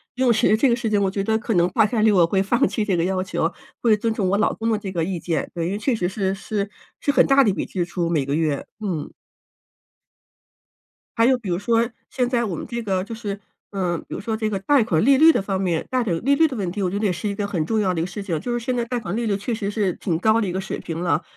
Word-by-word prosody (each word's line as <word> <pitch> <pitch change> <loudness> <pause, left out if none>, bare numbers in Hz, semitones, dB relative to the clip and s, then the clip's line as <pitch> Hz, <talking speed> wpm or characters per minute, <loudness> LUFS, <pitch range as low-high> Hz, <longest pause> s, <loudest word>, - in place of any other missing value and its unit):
游 260 0 +1
泳 - - +6
池 215 -1 +3
这 260 +5 +3
个 235 - +3
事 235 -1 -3
情， 205 -1 +2
我 195 - +2
觉 195 +1 -2
得 220 +2 +1
可 225 -1 -2
能 175 0 +4
大 220 0 +3
概 220 -1 0
率 220 - +5
我 180 -4 +4
会 190 +2 +1
放 235 +4 +2
弃 215 - -2
这 195 -3 +1
个 165 - +1
要 185 0 0
求， 170 -3 -1 0.3
会 220 -3 +4
尊 225 +1 -1
重 195 -4 0
我 200 - +2
老 215 - +2
公 225 +1 -2
的 220 - +2
这 200 -2 -6
个 170 -3 -1
意 180 +1 -2
见。 160 -4 -2
对， 170 -1 -2
因 175 - -1
为 200 - -2
确 245 +3 +1
实 180 -5 -1
是 195 0 -1
是 200 0 -3 0.3
是 285 - +1
很 - - +4
大 275 0 +5
的 215 - +3
一 - - +1
笔 - - -3
支 180 - -2
出， 175 0 -2
每 155 -4 +1
个 140 +1 -1
月。 155 -3 0 0.2
嗯。 185 -8 -3 2.1
还 230 - +5
有 260 +1 +4
比 225 -6 -7
如 175 - 0
说 230 +4 +1 0.2
现 250 -2 0
在 240 -2 +1
我 200 -7 -2
们 - - -6
这 235 -1 -4
个 190 -3 0
就 225 +3 -7
是， 205 -3 -5 0.3
嗯， 180 -4 -1
比 - - -8
如 - - -4
说 220 +2 -2
这 220 -1 -1
个 200 -2 -2
贷 270 +5 +3
款 165 -7 +1
利 270 +3 +5
率 320 +3 +8
的 - - 0
方 195 -1 -2
面 175 -4 -1
贷 255 -1 +1
款 190 -7 0
利 280 +1 +4
率 320 - +5
的 265 -5 -6
问 190 -4 -2
题， 205 +3 -4
我 185 - +1
觉 200 - -2
得 215 - -1
也 195 - +2
是 185 +5 -3
一 - - -2
个 200 0 -2
很 175 -6 -1
重 220 +6 0
要 190 -3 +1
的 165 - -1
一 - - 0
个 - - -3
事 185 +3 -6
情。 175 -6 -2
就 245 - -4
是 240 - 0
现 250 +2 -2
在 240 - 0
贷 240 0 -2
款 195 -3 -4
利 235 +1 -1
率 200 -3 0
确 230 +3 -3
实 205 -2 -3
是 205 -4 0
挺 165 -2 -2
高 220 +4 +3
的 205 - -1
一 - - -2
个 185 - -2
水 190 - -4
平 165 -1 -5
了， 170 -2 0
205 Hz, 335 characters per minute, -22 LUFS, 180-230 Hz, 2.1 s, 率